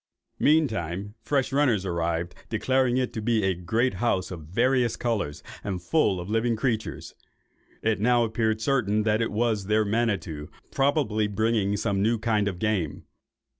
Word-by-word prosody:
Meantime 105 - +1
fresh 135 0 0
runners 125 -9 +2
arrived, 85 -1 -1 0.2
declaring 130 +2 +1
it 130 -1 -1
to 110 - -4
be 110 -1 +1
a 95 0 +2
great 110 +9 0
house, 95 -3 0
of 80 -4 -8
various 120 +6 +2
colours, 80 -12 -2 0.2
and 95 -4 -4
full 105 - +2
of 90 - -6
living 115 +2 +1
creatures. 110 -1 -2 0.7
It 110 -2 +1
now 120 +2 +3
appeared 110 -1 0
certain 110 -5 +1
that 110 +1 +1
it 115 - -1
was 110 -2 0
their 110 +1 +2
Manitto, 100 -9 -1 0.2
probably 135 -7 +1
bringing 105 -1 +1
some 100 -1 0
new 115 +3 +2
kind 110 -2 +1
of 95 -3 -3
game. 90 -7 -1
110 Hz, 155 wpm, -26 LUFS, 95-120 Hz, 0.7 s, now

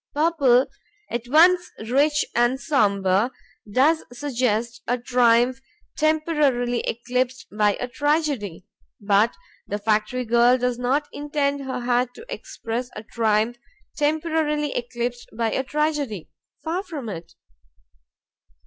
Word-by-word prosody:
Purple, 285 -5 +4 0.5
at 235 0 -3
once 350 +6 +5 0.2
rich 290 +4 +2
and 240 +2 +2
somber, 200 - +2 0.4
does 295 +8 +3
suggest 240 -3 -1
a 245 - +1
triumph 245 +1 +3 0.4
temporarily 300 -6 +1
eclipsed 250 +2 -2
by 210 -1 +3
a 250 - -4
tragedy. 285 - -1 0.3
But 205 +2 +2 0.3
the 205 - -2
factory 215 +4 0
girl 240 +2 +4
does 250 -1 -1
not 275 +4 0
intend 285 -1 -1
her 255 -1 -3
hat 245 0 0
to 455 - -11
express 240 +2 -5
a 215 - -7
triumph 225 +1 0 0.4
temporarily 300 -1 0
eclipsed 240 0 -4
by 230 -1 0
a - - 0
tragedy; 290 - -2 0.3
far 335 +3 -1
from 315 - -7
it. 170 -4 -7
250 Hz, 115 wpm, -23 LUFS, 230-295 Hz, 0.5 s, once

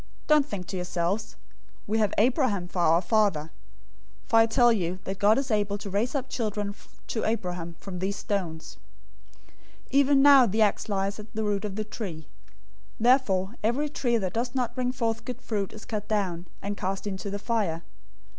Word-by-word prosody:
003:009 - - -24 0.2
Don't 300 -2 +5
think 195 -8 -5
to 190 - -6
yourselves, 180 +4 -2 0.5
'We 220 +2 0
have 210 -2 +2
Abraham 230 - +2
for 180 - -5
our 170 +1 +4
father,' 175 -6 +1 0.7
for 225 - +2
I 225 0 +6
tell 240 +1 +5
you 180 -4 -1
that 195 +1 -5
God 210 +2 +5
is 270 -2 -1
able 205 -1 +1
to 200 -1 -7
raise 230 +7 0
up 270 -1 -1
children 210 -5 -2 0.3
to 220 - -3
Abraham 180 -6 -2
from 185 -3 -7
these 195 +2 -1
stones. 175 -7 -4 0.6
003:010 - - -28 0.4
"Even 275 0 +5
now 275 -4 +8
the 220 +2 +3
axe 210 +1 0
lies 195 0 -1
at 210 +1 -10
the 220 - -1
root 205 0 -1
of 200 -2 -4
the 215 - -2
trees. 195 -7 -6 0.8
Therefore, 225 -5 +3
every 265 +7 +1
tree 240 -5 +1
that 190 -4 -2
doesn't 240 0 -1
bring 250 -1 -1
forth 230 -3 -2
good 250 -1 -6
fruit 205 -6 -3
is 215 - -11
cut 210 -2 -4
down, 185 -5 -1 0.2
and 200 +1 -2
cast 195 +1 -3
into 195 -1 -4
the 200 - -3
fire. 200 -7 -1
210 Hz, 185 wpm, -27 LUFS, 190-235 Hz, 0.8 s, now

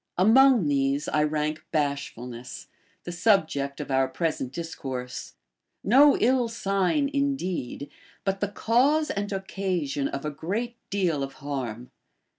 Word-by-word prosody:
Among 235 - +6
these 140 +1 +1
I 150 - +1
rank 150 +1 -1
bashfulness, 135 -5 -3 0.3
the 175 - -5
subject 160 -7 +1
of - - -5
our 130 0 +3
present 145 -3 -2
dis 165 +3 -5
course; 125 -2 -6 0.5
no 275 +7 +6
ill 250 0 +3
sign 200 - 0
indeed, 190 - -2 0.4
but 195 0 -1
the 205 - 0
cause 260 +9 +2
and 205 +1 -3
occasion 185 -8 -2
of 140 +2 -5
a 150 - -1
great 210 +11 -3
deal 180 -7 0
of 135 0 -4
harm. 125 -4 -5
165 Hz, 130 wpm, -26 LUFS, 140-210 Hz, 0.5 s, Among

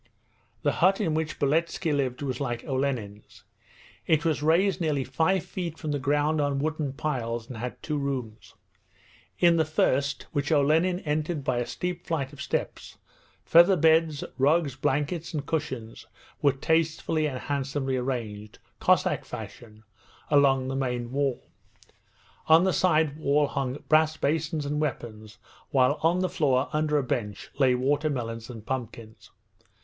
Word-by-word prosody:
The - - +3
hut 190 +3 +4
in 160 - 0
which 155 0 -2
Beletski 160 +3 0
lived 130 -1 -2
was 135 0 -3
like 120 -3 -3
Olenin's. 130 -7 -3 0.6
It 160 0 +2
was 155 -3 +1
raised 180 +5 +2
nearly 150 -4 0
five 160 +8 +1
feet 175 -3 -5
from 155 - -4
the 145 - -1
ground 145 +3 +1
on 145 -1 0
wooden 150 -1 -2
piles, 120 -6 -3
and 125 - -8
had 125 +2 -6
two 150 -2 -2
rooms. 130 -6 -5 0.8
In 170 -1 +4
the 160 - +4
first 140 -2 0
(which 145 0 -2
Olenin 160 +5 +3
entered 150 0 -2
by 130 -2 0
the 120 - -2
steep 180 +8 -4
flight 145 -4 -2
of 140 - -10
steps) - - -4 0.5
feather 170 +3 +6
beds, 160 -2 +3 0.2
rugs, 145 0 +2
blankets, 150 +5 -1
and 145 -1 -3
cushions 130 -8 -4 0.3
were 140 - +5
tastefully 160 +2 0
and 130 -3 -4
handsomely 135 0 -2
arranged, 115 -5 -4 0.2
Cossack - - +2
fashion, 110 -2 -10 0.5
along 135 -3 +4
the 135 - -3
main 125 -3 -2
wall. 135 -2 -1 1.0
On 160 +2 +7
the 190 -1 +2
side 155 -5 +2
wall 145 0 +2
hung 135 -1 -3
brass 155 0 +3
basins 150 0 -1
and 150 +1 -1
weapons, 110 -6 -5 0.3
while 135 +2 +3
on 170 +3 +2
the 185 - +1
floor, 145 -7 +1
under 150 0 +1
a 145 - +1
bench, 105 -5 -4
lay 130 -2 +4
watermelons 130 -4 -1
and 115 -3 -9
pumpkins. 115 -4 -6
145 Hz, 150 wpm, -27 LUFS, 130-155 Hz, 1.0 s, On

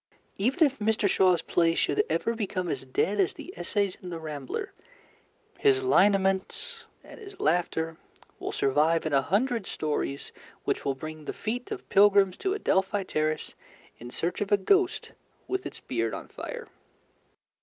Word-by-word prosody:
Even 265 - +4
if 280 -1 -1
Mr. 215 0 +2
Shaw's 185 -3 +3
plays 165 -1 +2
should - - +2
ever 165 +8 0
become 195 -5 -3
as 130 - -4
dead 200 +10 0
as 190 - +3
the - - -9
essays 195 +2 0
in 180 - -7
The 170 - -4
Rambler, 155 - -5 0.9
his 405 -2 +4
lineaments 205 - +2 0.2
and - - -13
his 400 -2 -11
laughter 165 - 0 0.4
will - - -3
survive 155 +5 +2
in 155 - -1
a 135 - +5
hundred 220 - 0
stories 145 -2 -3 0.3
which - - -1
will 135 -1 0
bring 155 +2 -8
the - - -4
feet 245 +4 -4
of - - -6
pilgrims 200 -2 +5
to 385 +1 -1
Adelphi 195 - +1
Terrace 155 -3 -2 0.5
in 120 - -8
search 170 +10 -2
of 205 0 -2
a 205 - +6
ghost 375 - +2 0.4
with 385 0 -2
its - - -9
beard 115 -4 -2
on - - -8
fire. - - -7
190 Hz, 160 wpm, -28 LUFS, 155-230 Hz, 0.9 s, a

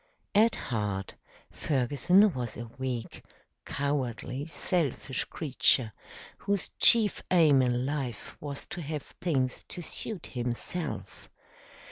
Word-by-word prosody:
At 220 +3 +5
heart 105 -5 -3 0.4
Ferguson 150 - +3
was 120 -3 -4
a 120 - -5
weak, 125 -3 -4 0.4
cowardly, 135 -1 -2
selfish 160 -6 0
creature, 130 -6 +2 0.5
whose 200 -2 -1
chief 220 -4 +6
aim 155 -7 +6
in 125 0 +1
life 135 -5 -4
was 140 -1 -5
to 175 - -5
have 150 -2 -4
things 130 -7 -2
to 175 - -7
suit 195 +3 -5
himself. 125 +8 -4
140 Hz, 105 wpm, -29 LUFS, 125-170 Hz, 0.5 s, chief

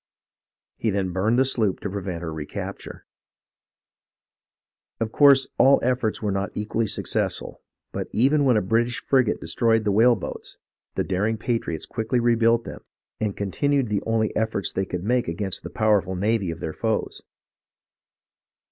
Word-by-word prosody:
He 115 - -1
then 95 -2 -1
burned 105 +6 +1
the 130 - +4
sloop 110 -7 +1
to 105 - -3
prevent 95 -4 -4
her 80 -2 -4
recapture." 75 -2 -7 1.9
Of 110 -1 -2
course 140 -1 +6
all 135 +1 +6
efforts 120 -3 0
were 105 - 0
not 100 +1 -1
equally 110 +2 -1
successful, - - -2 0.3
but - - -4
even 140 +5 +3
when 125 -5 +4
a 105 - +1
British 115 +5 0
frigate 130 -5 +1
destroyed 110 +7 +1
the 105 - +1
whale 115 +4 +5
boats, 95 - -7 0.4
the - - 0
daring 105 +4 -1
patriots 115 - -2
quickly 115 +2 -1
rebuilt 115 0 +3
them, - - -9 0.4
and 105 -3 -2
continued 135 +6 0
the 105 -1 0
only 110 -1 0
efforts 110 -3 -1
they 95 - -1
could 90 -1 -5
make 120 +3 +1
against 90 +3 -3
the - - -7
powerful 105 -4 +1
navy 100 0 0
of 85 0 -6
their 80 - -4
foes. 110 -1 -2
110 Hz, 155 wpm, -24 LUFS, 95-120 Hz, 1.9 s, course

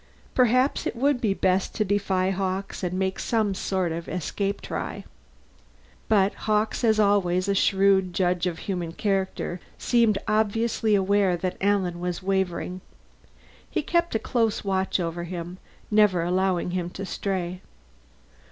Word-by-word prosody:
Perhaps 255 +2 +3
it - - -3
would 270 +1 +1
be 205 -4 +1
best 190 0 +1
to 215 - +1
defy 190 -2 +1
Hawkes 190 0 -3
and 180 -1 -2
make 190 0 -1
some 215 -4 +1
sort 185 -2 -1
of 165 +1 -5
escape 195 +3 -2
try. - - -5 1.1
But 200 -2 +4 0.2
Hawkes, 215 +3 +1
as 220 -2 +3
always 195 -3 +2
a 200 - +2
shrewd 195 -1 +3
judge 180 0 +1
of 170 -2 -3
human 175 -4 -3
character, 190 -2 -1 0.2
seemed 230 -4 +3
obviously 220 0 +1
aware 195 -2 +2
that 180 +1 -3
Alan 190 -3 +1
was 180 0 -3
wavering. 185 -1 -1 0.9
He - - -1
kept 340 -5 +1
a - - +5
close 225 -1 0
watch 190 -1 0
over 170 0 -3
him, 175 +1 -6 0.3
never 210 -5 +4
allowing 180 0 0
him 175 -1 -2
to 195 +2 -6
stray. 185 -2 -3
190 Hz, 145 wpm, -25 LUFS, 180-210 Hz, 1.1 s, a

